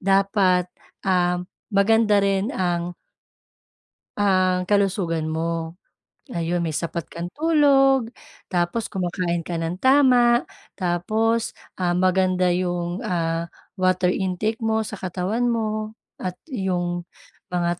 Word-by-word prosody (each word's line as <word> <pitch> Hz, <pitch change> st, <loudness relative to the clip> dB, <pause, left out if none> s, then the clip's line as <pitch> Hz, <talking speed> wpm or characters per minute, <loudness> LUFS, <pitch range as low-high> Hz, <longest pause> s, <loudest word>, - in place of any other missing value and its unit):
dapat, 195 Hz, -2 st, +2 dB, 0.3 s
um, 180 Hz, -2 st, +1 dB, 0.3 s
maganda 210 Hz, 0 st, +4 dB
rin 195 Hz, +1 st, +1 dB
ang 175 Hz, -1 st, -1 dB, 1.2 s
Ang 185 Hz, -2 st, +2 dB
kalusugan 185 Hz, -6 st, +1 dB
mo? 165 Hz, +1 st, -3 dB, 0.5 s
Ayun 175 Hz, -7 st, -2 dB
may 165 Hz, -3 st, -2 dB
sapat 170 Hz, 0 st, -3 dB
kang 170 Hz, +1 st, -6 dB
tulog, 275 Hz, -6 st, +3 dB, 0.4 s
tapos 180 Hz, +5 st, -1 dB
kumakain 175 Hz, -2 st, -2 dB
ka 175 Hz, -, -3 dB
ng 165 Hz, +2 st, -3 dB
tama, 255 Hz, -3 st, +5 dB, 0.3 s
tapos, 215 Hz, +6 st, 0 dB, 0.2 s
ah, 175 Hz, -1 st, +1 dB
maganda 185 Hz, 0 st, +2 dB
yung, 175 Hz, 0 st, -1 dB
ah, 165 Hz, -1 st, -1 dB, 0.3 s
water 185 Hz, -1 st, +2 dB
intake 190 Hz, +4 st, -1 dB
mo 220 Hz, -1 st, 0 dB
sa 215 Hz, -2 st, -7 dB
katawan 190 Hz, +6 st, -1 dB
mo 215 Hz, -2 st, -2 dB, 0.2 s
at 180 Hz, -1 st, -4 dB, 0.2 s
yung 175 Hz, -5 st, -2 dB, 0.4 s
mga 175 Hz, -1 st, -1 dB
185 Hz, 110 wpm, -23 LUFS, 175-215 Hz, 1.2 s, tama